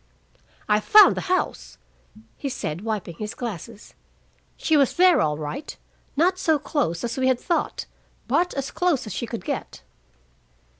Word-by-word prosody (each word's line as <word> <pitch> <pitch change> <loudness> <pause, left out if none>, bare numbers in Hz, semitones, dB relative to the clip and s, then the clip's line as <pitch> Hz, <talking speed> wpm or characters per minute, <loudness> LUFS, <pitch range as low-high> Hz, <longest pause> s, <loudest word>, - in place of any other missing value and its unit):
"I 210 0 +3
found 420 - +7
the - - -3
house," 370 0 -2 0.6
he 280 - -4
said, 175 - -4
wiping 205 -6 -4
his 210 +1 -5
glasses. 225 -1 -7 0.6
"She 320 - +1
was 280 -4 +3
there, 365 0 +5
all 150 -1 0
right, 155 - -6 0.4
not 365 +4 +2
so 320 -4 +2
close 260 - -2
as 235 +2 -3
we 260 - +2
had 260 -2 +2
thought, 345 - -2 0.4
but 355 +1 +1
as 275 -1 -3
close 350 -9 0
as 215 - -6
she 235 - -4
could 230 -5 -6
get." - - -5
255 Hz, 155 wpm, -24 LUFS, 210-320 Hz, 0.6 s, found